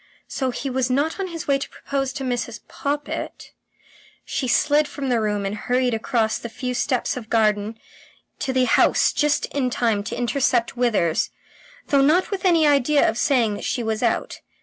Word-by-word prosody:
So 260 -2 -2
he 255 +3 -4
was 260 -1 0
not 285 +8 0
on 385 - -2
his 335 -1 -7
way 275 -1 +2
to - - -5
propose 270 -1 -3
to 275 - -5
Mrs. 240 -2 -3
Poppit.... 290 +1 -4 0.7
She 260 - -2
slid 290 +4 +3
from 275 -3 -5
the 240 -2 +2
room 210 -2 -1
and 195 - -2
hurried 250 +3 0
across 225 0 0
the 235 - -7
few 250 +2 -4
steps 250 0 0
of 235 -3 -8
garden 215 -1 +1 0.6
to 265 - -1
the 260 -1 +2
house 235 - +3
just 295 0 +1
in 265 -3 0
time 225 -4 0
to - - -4
intercept 245 0 +1
Withers 215 -10 +1 0.6
though 280 -2 +4
not 315 +9 +3
with 390 -2 -3
any 335 -4 +4
idea 290 0 +4
of 220 - 0
saying 245 -6 +2
that 205 - -6
she 245 - -1
was 220 -1 -2
out. - - -1
255 Hz, 185 wpm, -22 LUFS, 230-280 Hz, 0.7 s, though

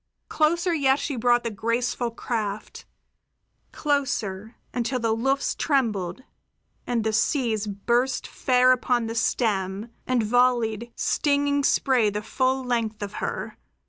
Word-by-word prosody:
Closer 340 +3 +2
yet 275 -4 +3
she 290 -1 -3
brought 240 0 +2
the 230 - -2
graceful 235 +3 -1
craft; 215 -3 -4 0.9
closer, 230 -8 -2 0.2
until 250 +1 -1
the 225 -1 +1
luffs 270 +4 0
trembled 235 - -1 0.6
and 235 -2 0
the 220 0 0
seas 220 -3 +1
burst 240 +6 0
fair 255 0 +3
upon 245 -2 +1
the 225 - -4
stem 210 -2 -1 0.2
and 250 -3 +2
volleyed 235 -1 +1
stinging 285 -1 +1
spray 255 -5 +3
the 210 +1 -4
full 260 +3 0
length 230 -4 -2
of 205 0 -6
her. - - -4
240 Hz, 125 wpm, -25 LUFS, 220-260 Hz, 0.9 s, yet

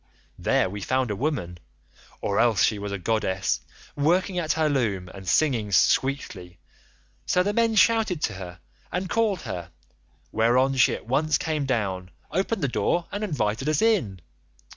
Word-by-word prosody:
There - - +2
we 100 +2 -6
found 130 +2 0
a - - -2
woman, 95 - -3 0.6
or 100 - 0
else 115 -5 +3
she 105 - +2
was 100 0 -5
a 100 - -2
goddess, 95 -2 -1 0.3
working 180 +5 +1
at 160 -2 0
her 160 -1 +1
loom 105 -11 -1
and 95 -1 -11
singing 115 - +2
sweetly; 95 -7 +1 0.7
so 180 - +3
the 205 +2 -1
men 230 0 +2
shouted 215 -3 +3
to 110 - 0
her 90 -2 -9 0.3
and 180 +2 -2
called 210 -4 +1
her, 85 -1 -6 0.6
whereon 125 +4 +3
she 130 - +4
at - - -10
once 150 +6 +1
came 155 -3 -2
down, 95 -7 -1 0.2
opened 190 +1 -1
the - - +3
door, 170 +6 0
and 205 +1 -3
invited 130 - -1
us 155 - +1
in. 175 - +1
130 Hz, 165 wpm, -25 LUFS, -, 0.7 s, she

